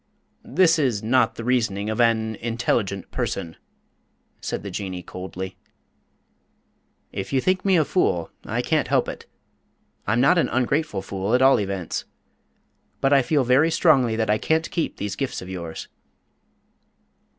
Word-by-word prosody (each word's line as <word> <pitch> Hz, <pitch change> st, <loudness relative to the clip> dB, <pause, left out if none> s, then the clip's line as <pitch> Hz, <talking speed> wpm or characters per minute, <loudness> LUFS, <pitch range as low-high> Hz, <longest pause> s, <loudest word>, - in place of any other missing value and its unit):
"This 170 Hz, -3 st, +3 dB
is 125 Hz, -8 st, 0 dB
not 125 Hz, +3 st, +2 dB
the 115 Hz, -, -6 dB
reasoning 115 Hz, -5 st, 0 dB
of 110 Hz, +2 st, 0 dB
an 110 Hz, -1 st, +2 dB
intelligent 115 Hz, -4 st, -1 dB
person," 80 Hz, -1 st, -3 dB, 0.8 s
said -, -, -4 dB
the 100 Hz, -, -6 dB
Jinnee, 95 Hz, -2 st, -5 dB
coldly. 95 Hz, +1 st, -7 dB, 1.5 s
"If 95 Hz, -1 st, -5 dB
you 135 Hz, -, +2 dB
think 185 Hz, +6 st, +1 dB
me 190 Hz, -2 st, +4 dB
a 155 Hz, -, +3 dB
fool, 90 Hz, -, 0 dB
I -, -, -2 dB
can't -, -, +1 dB
help -, -, +2 dB
it. -, -, -7 dB, 0.8 s
I'm 115 Hz, +3 st, +2 dB
not 155 Hz, +8 st, +5 dB
an -, -, +1 dB
ungrateful 130 Hz, -4 st, 0 dB
fool, 100 Hz, +4 st, -1 dB
at 130 Hz, -, +3 dB
all 135 Hz, +1 st, +6 dB
events. 95 Hz, -4 st, -3 dB, 0.9 s
But 135 Hz, +1 st, +3 dB
I 140 Hz, -, +6 dB
feel 140 Hz, +2 st, +1 dB
very 130 Hz, +6 st, +4 dB
strongly 145 Hz, -9 st, +3 dB
that 110 Hz, -1 st, +1 dB
I 105 Hz, -, +2 dB
can't 160 Hz, +1 st, 0 dB
keep 170 Hz, -, -2 dB
these 100 Hz, -1 st, -3 dB
gifts 135 Hz, +3 st, -3 dB
of 90 Hz, -, -9 dB
yours." 85 Hz, -3 st, -6 dB
115 Hz, 150 wpm, -23 LUFS, 100-140 Hz, 1.5 s, all